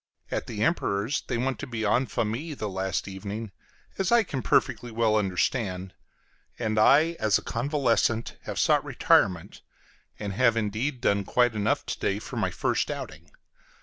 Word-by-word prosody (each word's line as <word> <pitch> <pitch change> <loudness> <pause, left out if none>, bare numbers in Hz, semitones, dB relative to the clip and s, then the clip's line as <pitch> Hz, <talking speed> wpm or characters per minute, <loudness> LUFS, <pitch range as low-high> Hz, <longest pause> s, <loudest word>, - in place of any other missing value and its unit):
At - - -2
the - - -2
Emperor's 100 +8 0
they 120 - -1
want 130 +2 -1
to 140 - -5
be 115 -3 -3
en 125 +5 +2
famille 125 +9 -2
the 110 - -4
last 95 -1 -2
evening, 100 +2 -6 0.5
as 190 +1 0
I 235 -1 +6
can 135 -9 -4
perfectly 120 - +1
well 110 -1 +1
understand; 95 -1 -1 0.6
and 110 -2 0
I, 150 +9 +5
as 110 -1 +3
a - - -8
convalescent, 120 -3 0
have - - -5
sought - - +3
retirement, 90 -4 +1 0.6
and 100 -2 -4
have 115 +1 +3
indeed 115 +5 -2
done 100 -5 +2
quite 120 +4 +2
enough 105 0 0
to - - -4
day 100 - 0
for 105 - -7
my - - +1
first - - -1
outing. - - -7
110 Hz, 165 wpm, -27 LUFS, 100-125 Hz, 0.6 s, I